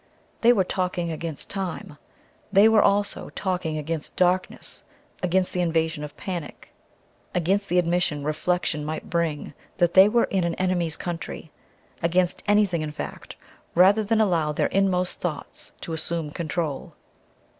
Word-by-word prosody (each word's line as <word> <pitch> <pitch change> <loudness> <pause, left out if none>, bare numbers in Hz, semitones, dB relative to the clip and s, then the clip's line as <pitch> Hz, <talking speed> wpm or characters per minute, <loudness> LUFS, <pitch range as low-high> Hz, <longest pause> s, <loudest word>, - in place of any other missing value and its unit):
They 235 - +7
were 205 -6 +3
talking 180 -2 -2
against 160 -1 -5
time. 180 -6 -5 0.5
They 200 +2 +7
were 220 -1 +5
also 205 +1 +1
talking 180 -5 -2
against 155 +1 -4
darkness, 185 +1 0 0.4
against 180 +1 +1
the 180 - 0
invasion 160 -2 0
of 150 - -8
panic, 175 -6 -6 0.6
against 195 +4 +1
the 180 - +2
admission 175 -4 +1
reflection 155 +1 -1
might 155 +1 -5
bring 165 -4 -1 0.2
that 175 -1 +2
they 190 +2 +8
were 235 +2 +3
in 190 -2 0
an 170 -1 -1
enemy's 175 -4 0
country 165 -2 -6 0.5
against 175 +1 +1
anything, 205 -5 +3
in 155 -1 -3
fact, 150 - -7 0.4
rather 195 +5 +6
than 220 +2 +1
allow 170 -8 +2
their 150 - 0
inmost 185 -2 +1
thoughts 175 -4 -5
to 165 - -5
assume 160 -1 -2
control. 160 -3 -3
175 Hz, 145 wpm, -25 LUFS, 160-190 Hz, 0.6 s, they